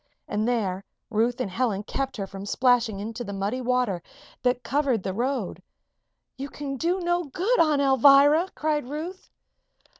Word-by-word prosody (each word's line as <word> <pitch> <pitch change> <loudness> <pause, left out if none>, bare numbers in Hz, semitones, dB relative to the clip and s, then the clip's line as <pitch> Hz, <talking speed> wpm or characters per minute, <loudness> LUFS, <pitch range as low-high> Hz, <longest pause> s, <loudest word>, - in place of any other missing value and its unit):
And 215 +2 -1
there 200 -6 -1 0.3
Ruth 235 +3 +1
and 210 -7 -2
Helen 210 -1 -1
kept 270 +4 -3
her 200 - -3
from 195 +1 -8
splashing 245 -4 +2
into 225 +4 -5
the 200 -3 -6
muddy 200 +6 -2
water 250 -7 0 0.4
that 250 0 +1
covered 270 -7 0
the 190 - -2
road. 255 +6 -2 0.8
"You 275 +2 -5
can 280 -1 -5
do 345 +7 0
no 350 0 0
good, 380 - 0
Aunt 300 -3 +3
Alvirah!" 280 +5 +6
cried 300 -4 -1
Ruth. 330 +6 -6
250 Hz, 155 wpm, -25 LUFS, 215-290 Hz, 0.8 s, Alvirah